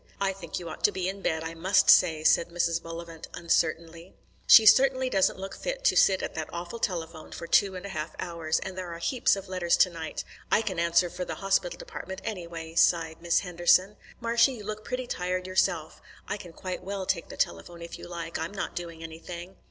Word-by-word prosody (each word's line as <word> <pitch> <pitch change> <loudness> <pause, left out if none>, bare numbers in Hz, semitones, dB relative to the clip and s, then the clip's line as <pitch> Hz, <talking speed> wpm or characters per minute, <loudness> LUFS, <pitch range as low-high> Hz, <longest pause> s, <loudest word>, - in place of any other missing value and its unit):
"I 195 -1 +1
think 175 -4 -7
you 175 - -6
ought 155 - -8
to - - +4
be 185 -1 -2
in 195 +1 -4
bed, 160 -3 -1
I 165 0 -5
must 185 +4 +2
say," 160 -4 +5
said 170 - +4
Mrs. 170 -1 0
Bullivant 165 -1 -8
uncertainly. 170 +1 -1 0.3
"She 220 - +9
certainly 260 +2 +5
doesn't 190 -1 +2
look 195 +1 -6
fit - - -4
to - - +4
sit 190 -1 +4
at - - -4
that 160 -1 -4
awful 175 +7 -6
telephone 165 -6 -4
for - - -7
two 190 +3 +3
and 185 +1 -7
a - - -5
half 155 -4 -5
hours; 165 -2 -2
and 190 - -6
there 185 -2 -5
are 170 - -6
heaps 235 +8 +2
of 195 0 -8
letters 185 -2 +1
to 180 - +4
night. 165 -2 -5 0.3
I 220 - +4
can 190 -5 -3
answer 170 +1 +3
for 180 - -4
the - - -5
Hospital 195 -3 0
Department, 190 +2 -7
anyway," 170 -6 -6
sighed 165 -1 +2
Miss 170 0 +2
Henderson. 180 +2 +3 0.2
"Marshy, 235 +3 +3
you 220 -4 -9
look 215 +1 -5
pretty 250 +2 -3
tired 180 -4 -2
yourself. 175 -4 0 0.3
I - - -2
can 180 -4 -10
quite 185 +2 -6
well 195 0 -4
take 170 -3 -1
the - - -9
telephone 170 -1 -2
if 170 - -8
you - - -9
like. 170 -1 -5
I'm 165 +5 -4
not 195 - -4
doing 170 -2 -6
anything." 170 +3 -9
175 Hz, 215 wpm, -28 LUFS, 165-195 Hz, 0.3 s, She